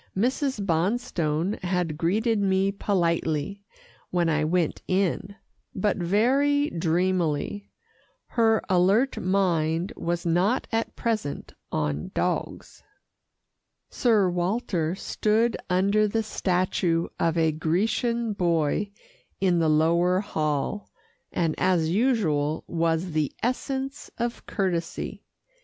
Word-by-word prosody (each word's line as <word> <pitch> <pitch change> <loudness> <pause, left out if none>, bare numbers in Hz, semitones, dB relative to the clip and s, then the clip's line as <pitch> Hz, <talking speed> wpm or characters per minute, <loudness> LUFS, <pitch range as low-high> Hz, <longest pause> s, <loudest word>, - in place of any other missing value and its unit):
Mrs. 255 0 0
Bonstone 175 -1 0
had 180 -3 -1
greeted 210 +8 +1
me 195 0 +2
politely, 175 -2 -1 0.5
when 175 -2 +1
I 155 -1 +1
went 165 +1 0
in, 195 +1 0 0.4
but 205 +2 +1
very 265 - +2
dreamily. 175 +2 0 0.6
Her 225 -2 +2
alert 195 +8 +3
mind 175 -3 +1
was 170 0 -3
not 180 +9 +1
at 225 0 -1
present 215 -11 -3 0.2
on 75 -1 -2
dogs. - - -2 1.1
Sir 215 -6 +3
Walter 175 -2 -1
stood 220 +3 +1
under 200 +4 +3
the 225 +2 0
statue 180 -4 0
of 165 0 +1
a 160 -1 +3
Grecian 215 +8 0
boy 170 +1 +1 0.5
in 180 -3 +2
the 160 -1 +2
lower 170 +4 +3
hall, 155 0 -2 0.4
and 165 -3 0
as 165 -4 +2
usual 175 - +1
was 165 +1 0
the 155 -3 0
essence 265 +3 -2
of 235 0 -3
courtesy. 175 -5 -2
185 Hz, 105 wpm, -26 LUFS, 165-215 Hz, 1.1 s, alert